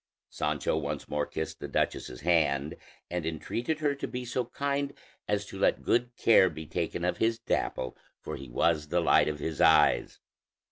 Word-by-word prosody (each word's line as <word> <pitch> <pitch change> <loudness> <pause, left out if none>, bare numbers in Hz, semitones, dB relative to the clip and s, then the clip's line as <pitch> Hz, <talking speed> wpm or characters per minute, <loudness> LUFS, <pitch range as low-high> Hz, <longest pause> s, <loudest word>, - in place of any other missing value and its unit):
Sancho - - -1
once 75 -1 -3
more 75 0 -1
kissed 80 - -5
the - - -5
duchess's 60 - -2
hand, 75 -3 +2 0.4
and 90 -1 -2
entreated 115 - -3
her 145 -2 +2
to 140 - -5
be 125 0 -5
so 125 +1 -1
kind 140 +3 -2 0.3
as 105 0 0
to 95 - -9
let - - +2
good 120 +1 +1
care 95 -5 +6
be 80 -1 -8
taken - - -2
of - - 0
his 115 0 +1
Dapple, 90 - -2 0.2
for - - -6
he 70 -1 -9
was 75 +4 +1
the 85 +4 +1
light 85 - +4
of 75 -1 -2
his 75 +1 -3
eyes. 80 -2 +4
85 Hz, 180 wpm, -29 LUFS, 75-120 Hz, 0.4 s, care